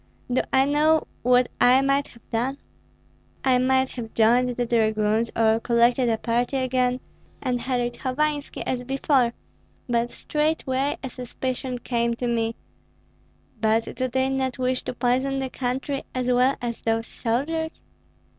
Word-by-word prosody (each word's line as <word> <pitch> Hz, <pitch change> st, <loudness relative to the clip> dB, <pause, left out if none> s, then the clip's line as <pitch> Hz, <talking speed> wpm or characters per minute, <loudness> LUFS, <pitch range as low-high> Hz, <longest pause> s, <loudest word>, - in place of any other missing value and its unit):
Do 255 Hz, -, +3 dB
I 265 Hz, 0 st, +4 dB
know 305 Hz, +2 st, +3 dB, 0.2 s
what 250 Hz, 0 st, +4 dB
I 255 Hz, +2 st, +6 dB
might 275 Hz, +1 st, +1 dB
have 235 Hz, -, -19 dB
done? 250 Hz, +4 st, -1 dB, 0.9 s
I 255 Hz, -2 st, +4 dB
might 260 Hz, +1 st, +2 dB
have 230 Hz, -3 st, -7 dB
joined 240 Hz, +3 st, +4 dB
the 245 Hz, 0 st, -1 dB
dragoons, 220 Hz, -1 st, +1 dB
or 225 Hz, 0 st, +3 dB
collected 235 Hz, +1 st, +3 dB
a 225 Hz, -, +1 dB
party 240 Hz, +4 st, 0 dB
again, 255 Hz, -1 st, +1 dB, 0.4 s
and 250 Hz, -2 st, -1 dB
harried 245 Hz, -2 st, -1 dB
Hovanski 290 Hz, +2 st, -2 dB
as 250 Hz, -1 st, -2 dB
before. 265 Hz, -2 st, +1 dB, 0.5 s
But 235 Hz, -1 st, +1 dB
straightway 290 Hz, -3 st, -1 dB
a 265 Hz, -, -3 dB
suspicion 255 Hz, +1 st, -4 dB
came 235 Hz, -1 st, -1 dB
to 245 Hz, -, -4 dB
me: 230 Hz, -1 st, 0 dB, 1.0 s
'But 220 Hz, +1 st, +1 dB
do 255 Hz, -, -1 dB
they 260 Hz, +1 st, 0 dB
not 265 Hz, -1 st, -1 dB
wish 255 Hz, 0 st, 0 dB
to -, -, -3 dB
poison 260 Hz, +3 st, +1 dB
the 265 Hz, -1 st, -3 dB
country 265 Hz, +2 st, -2 dB
as 255 Hz, -1 st, -1 dB
well 250 Hz, +2 st, +3 dB
as 235 Hz, -1 st, -3 dB
those 225 Hz, 0 st, 0 dB
soldiers?' 320 Hz, +10 st, -2 dB
250 Hz, 145 wpm, -24 LUFS, 235-265 Hz, 1.0 s, I